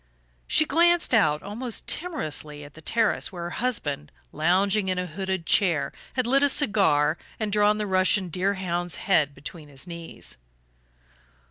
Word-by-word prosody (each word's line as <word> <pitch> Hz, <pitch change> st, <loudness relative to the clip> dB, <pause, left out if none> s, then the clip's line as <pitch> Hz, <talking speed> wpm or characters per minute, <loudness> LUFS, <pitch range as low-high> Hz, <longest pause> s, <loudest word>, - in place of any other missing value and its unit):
She 315 Hz, -, +4 dB
glanced 340 Hz, +1 st, +3 dB
out 155 Hz, -10 st, +3 dB
almost 225 Hz, +4 st, -4 dB
timorously 155 Hz, -, -3 dB
at 145 Hz, -1 st, -13 dB
the 160 Hz, -, -13 dB
terrace 225 Hz, +5 st, 0 dB
where 175 Hz, -2 st, -6 dB
her 170 Hz, -, -4 dB
husband, 150 Hz, -, -2 dB, 0.2 s
lounging 190 Hz, +5 st, +2 dB
in 185 Hz, -, 0 dB
a 180 Hz, -, -1 dB
hooded 190 Hz, +1 st, -4 dB
chair, 165 Hz, -9 st, +2 dB, 0.2 s
had 255 Hz, -2 st, 0 dB
lit 270 Hz, +3 st, +3 dB
a 285 Hz, -, +5 dB
cigar 195 Hz, -, +2 dB, 0.2 s
and 215 Hz, -2 st, -2 dB
drawn 210 Hz, 0 st, +3 dB
the 210 Hz, -, -2 dB
Russian 185 Hz, 0 st, +2 dB
deerhound's 180 Hz, -1 st, -1 dB
head 150 Hz, -7 st, +1 dB
between 150 Hz, 0 st, -9 dB
his 135 Hz, +1 st, -7 dB
knees. 170 Hz, -, -9 dB
185 Hz, 150 wpm, -25 LUFS, 155-215 Hz, 0.2 s, a